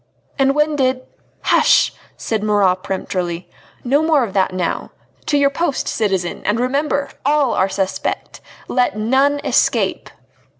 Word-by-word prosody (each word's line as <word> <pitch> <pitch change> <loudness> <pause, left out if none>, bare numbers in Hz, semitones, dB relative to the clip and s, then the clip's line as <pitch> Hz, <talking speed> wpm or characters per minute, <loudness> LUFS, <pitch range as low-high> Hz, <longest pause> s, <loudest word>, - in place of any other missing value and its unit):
"And 270 +1 +3
when 300 0 +2
did 260 -2 0 0.2
" - - -39
"Hush!" - - +4 0.2
said 220 -2 -2
Marat 205 -3 +2
peremptorily, 180 -2 -3 0.4
"no 275 +4 +2
more 315 -4 +3
of 210 -5 -4
that 190 -2 +2
now. 185 -2 -2 0.4
To 290 - +2
your 280 -1 +3
post, 310 -1 -1
citizen, 190 -5 -1
and 210 +3 0
remember 280 +2 0
all 290 -2 +2
are 190 - +1
suspect! 190 0 -3 0.3
let 245 -5 0
none 265 +6 +2
escape!" - - +1
250 Hz, 140 wpm, -18 LUFS, 195-280 Hz, 0.4 s, Hush